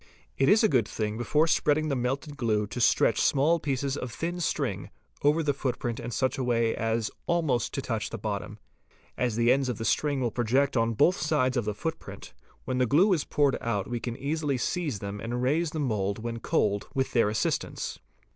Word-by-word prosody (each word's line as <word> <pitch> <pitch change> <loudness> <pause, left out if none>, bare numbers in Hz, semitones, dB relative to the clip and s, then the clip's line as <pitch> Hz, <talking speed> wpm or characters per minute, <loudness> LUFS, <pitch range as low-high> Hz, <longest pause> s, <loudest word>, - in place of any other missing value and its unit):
It 135 - +2
is 215 +2 +5
a - - +6
good 125 - +2
thing 105 -1 -3
before 150 +7 +2
spreading 155 -1 +2
the 140 - 0
melted 135 +4 -2
glue 110 -6 0
to 120 +4 -5
stretch 115 -1 +3
small 155 +5 +3
pieces 140 -2 -1
of 125 -4 -5
thin 170 +8 -3
string 170 - -2 0.3
over 150 +3 +3
the 145 -1 +1
footprint 125 -3 -3
in 120 0 -5
such 130 +3 -1
a - - 0
way 115 -2 +1
as 115 0 -1 0.2
almost 155 -9 +1
to 135 - -2
touch 115 -5 -2
the 115 - -5
bottom. 105 0 -4 0.6
As 120 -3 -1
the 120 +1 +3
ends 135 0 +2
of 125 - -2
the 115 - -4
string 145 +1 +1
will 120 -3 0
project 125 +5 +1
on 115 -1 +2
both 170 - +4
sides 150 -4 +1
of 120 -4 0
the 105 -1 -2
footprint, 160 +7 -6 0.3
when 130 -1 -1
the 125 - +3
glue 180 - +4
is 155 -5 0
poured 145 -2 +2
out 105 -4 -1
we 120 -1 -3
can 120 0 -5
easily 145 -1 -1
seize 150 - -2
them 100 +1 -6
and 120 +2 -3
raise 155 +6 +1
the 160 - -6
mould 105 -7 -1
when 115 +1 -5
cold 100 -2 0
with 130 -1 0
their 115 -4 +3
assist 110 - 0
ance. - - -6
125 Hz, 210 wpm, -28 LUFS, 115-145 Hz, 0.6 s, a